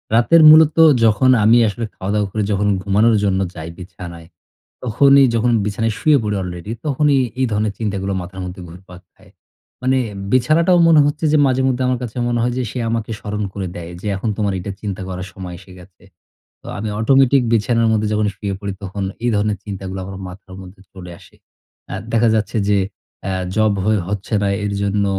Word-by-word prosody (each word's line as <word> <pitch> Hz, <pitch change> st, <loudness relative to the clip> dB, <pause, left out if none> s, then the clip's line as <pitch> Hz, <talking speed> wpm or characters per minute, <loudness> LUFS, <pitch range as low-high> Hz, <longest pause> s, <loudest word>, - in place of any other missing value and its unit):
রাতের 160 Hz, +8 st, +5 dB
মূলত 155 Hz, 0 st, +6 dB, 0.3 s
যখন 110 Hz, +4 st, +3 dB
আমি 115 Hz, +3 st, +5 dB
আসলে 115 Hz, +3 st, -3 dB
খাওয়া-দাওয়া 100 Hz, +1 st, -1 dB
করে 105 Hz, -1 st, -1 dB
যখন 100 Hz, 0 st, 0 dB, 0.2 s
ঘুমানোর 110 Hz, +3 st, +3 dB
জন্য 95 Hz, -2 st, +1 dB, 0.2 s
যাই 80 Hz, 0 st, -7 dB
বিছানায়, 85 Hz, -2 st, -10 dB, 0.6 s
তখনই 135 Hz, +3 st, +5 dB
যখন 115 Hz, +2 st, +1 dB
বিছানায় 110 Hz, +2 st, -1 dB
শুয়ে 150 Hz, -3 st, +4 dB
পড়ি 105 Hz, -1 st, -2 dB
অলরেডি 90 Hz, +2 st, -7 dB, 0.2 s
তখনই 145 Hz, -1 st, +2 dB, 0.2 s
এই 130 Hz, -, +3 dB
ধরনের 105 Hz, 0 st, 0 dB
চিন্তাগুলো 100 Hz, -3 st, -3 dB
মাথার 95 Hz, +1 st, -8 dB
মধ্যে 90 Hz, +1 st, -8 dB
ঘুরপাক 90 Hz, +1 st, -13 dB
খায়। -, -, -22 dB, 0.5 s
মানে 130 Hz, +1 st, +2 dB, 0.3 s
বিছানাটাও 155 Hz, +8 st, +3 dB
মনে 160 Hz, -2 st, +6 dB
হচ্ছে 150 Hz, +2 st, -2 dB
যে -, -, +4 dB
মাঝে 130 Hz, 0 st, +1 dB
মধ্যে 130 Hz, 0 st, -1 dB
আমার 125 Hz, -1 st, 0 dB
কাছে 120 Hz, -1 st, -7 dB
মনে 120 Hz, 0 st, 0 dB
হয় 120 Hz, +1 st, 0 dB
যে -, -, 0 dB
সে -, -, -6 dB
আমাকে 115 Hz, -1 st, -3 dB
স্মরণ 105 Hz, 0 st, -4 dB
করে 100 Hz, -2 st, -4 dB
দেয়। 85 Hz, 0 st, -7 dB
যে 105 Hz, -, -8 dB
,"এখন 105 Hz, +4 st, -3 dB
তোমার 100 Hz, -2 st, -1 dB
এটা 90 Hz, -, -6 dB
চিন্তা 100 Hz, -2 st, -5 dB
করার 90 Hz, 0 st, -5 dB
সময় 90 Hz, -1 st, -8 dB
এসে 95 Hz, 0 st, -15 dB
গেছে।" 90 Hz, 0 st, -18 dB, 0.6 s
তো -, -, -15 dB
আমি 110 Hz, +2 st, -4 dB
অটোমেটিক 135 Hz, +3 st, +4 dB
বিছানার 115 Hz, +1 st, +2 dB
মধ্যে 110 Hz, -1 st, +1 dB
যখন 105 Hz, 0 st, +1 dB
শুয়ে 100 Hz, -1 st, -4 dB
পড়ি 100 Hz, -2 st, -4 dB
তখন 100 Hz, +1 st, -5 dB, 0.2 s
এই 120 Hz, -, +2 dB
ধরনের 105 Hz, 0 st, 0 dB
চিন্তাগুলো 95 Hz, -1 st, -6 dB
আমার 95 Hz, 0 st, -8 dB
মাথার 95 Hz, +1 st, -12 dB
মধ্যে 95 Hz, +1 st, -13 dB
চলে 90 Hz, -2 st, -10 dB
আসে। -, -, -19 dB, 0.6 s
আ -, -, -4 dB, 0.2 s
দেখা 115 Hz, 0 st, +3 dB
যাচ্ছে 110 Hz, +1 st, -1 dB
যে 105 Hz, -1 st, +3 dB, 0.5 s
আ -, -, -1 dB, 0.2 s
জব 110 Hz, -1 st, +2 dB
হয়ে 110 Hz, -1 st, +2 dB
হচ্ছে 105 Hz, +2 st, -5 dB
না। -, -, +1 dB, 0.2 s
এরজন্য 100 Hz, 0 st, -1 dB
105 Hz, 190 wpm, -18 LUFS, 95-120 Hz, 0.6 s, মূলত